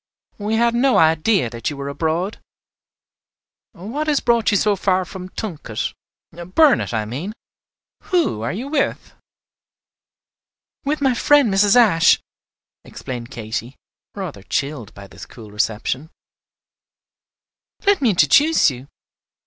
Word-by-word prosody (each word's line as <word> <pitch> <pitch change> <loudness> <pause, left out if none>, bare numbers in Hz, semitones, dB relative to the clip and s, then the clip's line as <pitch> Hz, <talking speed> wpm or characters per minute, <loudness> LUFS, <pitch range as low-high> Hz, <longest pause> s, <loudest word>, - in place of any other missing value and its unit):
We 210 +2 -1
had 235 +1 +2
no 255 +2 +3
idea 160 - +3
that 115 -2 -3
you 145 - -7
were 140 0 -5
abroad. 165 +7 -2 1.3
What 240 - -5
has 295 -2 +2
brought 235 -2 +2
you 205 - +3
so 210 +1 +2
far 185 -1 0
from 185 0 -9
Tunket, 160 - -5 0.4
Burnet, 185 - +2
I 110 -2 -1
mean? 145 - -5 0.7
Who 340 - 0
are 115 - -2
you 235 +9 -5
with?" 285 -1 -2 1.7
"With 295 +1 -1
my 265 -2 +3
friend 275 -2 +3
Mrs. 200 +3 +4
Ashe," 210 -9 +5 0.6
explained 120 -2 -8
Katy, 115 +1 -6 0.4
rather 180 - -6
chilled 140 +1 -3
by 100 - -11
this - - -12
cool 110 -4 -13
reception. 110 +7 -2 1.8
"Let 400 -3 +3
me 250 - +3
introduce 200 - +4
you. 130 +1 -10
Mrs. - - -27
185 Hz, 125 wpm, -20 LUFS, -, 1.8 s, Ashe